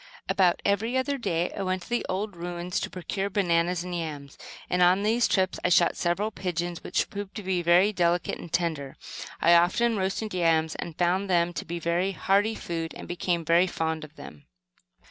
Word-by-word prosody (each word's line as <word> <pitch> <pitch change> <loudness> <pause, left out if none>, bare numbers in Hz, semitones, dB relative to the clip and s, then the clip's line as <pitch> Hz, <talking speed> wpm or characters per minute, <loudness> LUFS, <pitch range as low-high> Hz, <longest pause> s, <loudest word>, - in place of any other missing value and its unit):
About 180 -3 +2
every 220 +5 +1
other 275 +1 -1
day 170 -6 -1
I - - -4
went 185 -1 -1
to - - -14
the 240 0 0
old 195 +1 -2
ruins 175 +1 -3
to - - -4
procure 195 +2 -3
bananas 175 -3 +1
and 180 0 -6
yams; 150 -5 -5 0.3
and, 180 - 0
on 180 +3 +5
these 230 +3 +3
trips, 190 -1 +1
I - - +2
shot 175 -1 +4
several 190 +5 0
pigeons 175 -3 -3
which - - 0
proved 200 -1 -6
to 210 - -5
be 185 -1 0
very 175 +5 +4
delicate 175 -2 0
and 170 - -10
tender. 155 -6 -2 0.5
I 170 - +6
often 200 +7 +3
roasted 195 +2 -2
yams, 165 -3 +2
and 165 -2 -7
found 185 +3 +1
them 175 -1 +2
to - - -5
be 170 +2 -4
very 170 +3 0
hearty 205 +4 +2
food; 165 -4 -4
and - - -9
became 175 -1 -1
very 170 +3 +4
fond 160 -2 -2
of 155 +1 -12
them. 145 - -12
180 Hz, 195 wpm, -27 LUFS, 170-195 Hz, 0.5 s, I